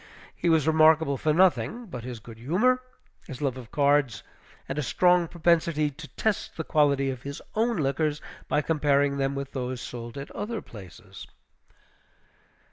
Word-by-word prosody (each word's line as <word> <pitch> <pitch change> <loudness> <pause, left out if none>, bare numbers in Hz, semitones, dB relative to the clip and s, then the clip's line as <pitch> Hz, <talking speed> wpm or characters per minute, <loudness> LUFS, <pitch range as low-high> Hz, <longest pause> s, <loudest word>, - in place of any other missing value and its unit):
He 175 - 0
was 160 -3 +3
remarkable 160 -2 +4
for 155 +4 0
nothing 190 +8 +2
but 125 - -8
his 125 -2 -6
good 110 0 -12
humor, 215 - +2 0.5
his 130 - -8
love 135 -4 -1
of 125 -4 -10
cards, 140 -7 +2 0.4
and 135 +2 -3
a - - +1
strong 180 +5 +3
propensity 165 -3 +1
to 150 +3 -11
test 220 -3 -1
the 160 - -2
quality 140 -3 +2
of 130 -2 -7
his 140 +1 -6
own 230 +1 +1
liquors 150 +1 0 0.3
by 150 - +1
comparing 145 -2 +2
them 135 0 0
with 140 0 -5
those 130 -1 -4
sold 120 0 -7
at 140 - -7
other 225 +1 -4
places. 95 - -12
145 Hz, 160 wpm, -26 LUFS, 135-165 Hz, 0.5 s, remarkable